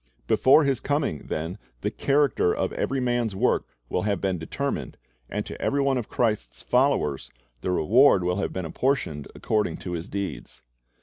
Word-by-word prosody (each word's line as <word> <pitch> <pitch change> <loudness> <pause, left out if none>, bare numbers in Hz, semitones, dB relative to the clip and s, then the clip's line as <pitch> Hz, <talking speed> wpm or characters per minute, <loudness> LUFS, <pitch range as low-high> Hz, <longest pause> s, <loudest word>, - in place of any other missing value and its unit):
"' - - -39
Before 140 +4 +5
His 135 -3 +1
coming, 145 - -1
then, 80 +3 -3 0.2
the - - -1
character 140 -10 +2
of - - -1
every 135 - -1
man's 120 -4 0
work - - +1 0.2
will 90 - -1
have 100 -1 0
been 95 -3 -1
determined, 80 - -3 0.3
and - - -3
to - - -8
every 140 - +1
one 135 -2 +2
of 115 - -6
Christ's 80 - -1
followers 125 - +1 0.3
the - - -2
reward 100 - +5
will 90 +1 0
have 100 - -1
been 95 -2 -4
apportioned 80 - -1
according 105 -7 0
to 90 - -6
his 85 +2 -4
deeds. 100 -1 -5
100 Hz, 175 wpm, -25 LUFS, 85-135 Hz, 0.3 s, Before